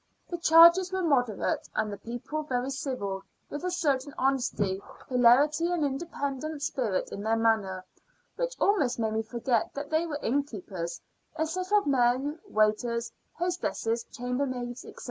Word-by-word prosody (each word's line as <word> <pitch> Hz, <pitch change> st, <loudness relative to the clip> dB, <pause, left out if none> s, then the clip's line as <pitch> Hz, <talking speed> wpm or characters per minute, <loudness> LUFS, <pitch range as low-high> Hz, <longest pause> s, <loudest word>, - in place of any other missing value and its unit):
The 345 Hz, -, -3 dB
charges 340 Hz, +3 st, +7 dB
were 375 Hz, -1 st, -1 dB
moderate, 245 Hz, -, +1 dB
and 215 Hz, -1 st, 0 dB
the -, -, -6 dB
people 245 Hz, +6 st, -5 dB
very 260 Hz, -3 st, -2 dB
civil, 225 Hz, -8 st, -3 dB, 0.3 s
with 290 Hz, -, -5 dB
a 365 Hz, -, 0 dB
certain 285 Hz, -6 st, 0 dB
honest 265 Hz, -1 st, 0 dB, 0.5 s
hilarity 275 Hz, +7 st, +4 dB
and 340 Hz, -4 st, +1 dB
independent 285 Hz, 0 st, -3 dB
spirit 225 Hz, -11 st, -1 dB
in 200 Hz, -, -5 dB
their 220 Hz, +2 st, +1 dB
manner, 210 Hz, -5 st, +1 dB, 0.5 s
which -, -, -2 dB
almost 300 Hz, -12 st, +2 dB
made 220 Hz, -2 st, -1 dB
me 220 Hz, -, +1 dB
forget 235 Hz, +1 st, -1 dB
that 285 Hz, +1 st, -5 dB
they 320 Hz, +2 st, +1 dB
were 295 Hz, -3 st, -3 dB
innkeepers, 210 Hz, -10 st, -2 dB, 0.4 s
a 315 Hz, 0 st, 0 dB
set 365 Hz, +4 st, -4 dB
of 415 Hz, -1 st, +4 dB
men 270 Hz, +3 st, +2 dB
waiters, 225 Hz, +2 st, +1 dB, 0.2 s
hostesses, 335 Hz, -10 st, -1 dB
chambermaids, 250 Hz, -1 st, -3 dB
&c. -, -, -12 dB
265 Hz, 145 wpm, -28 LUFS, 230-315 Hz, 0.5 s, charges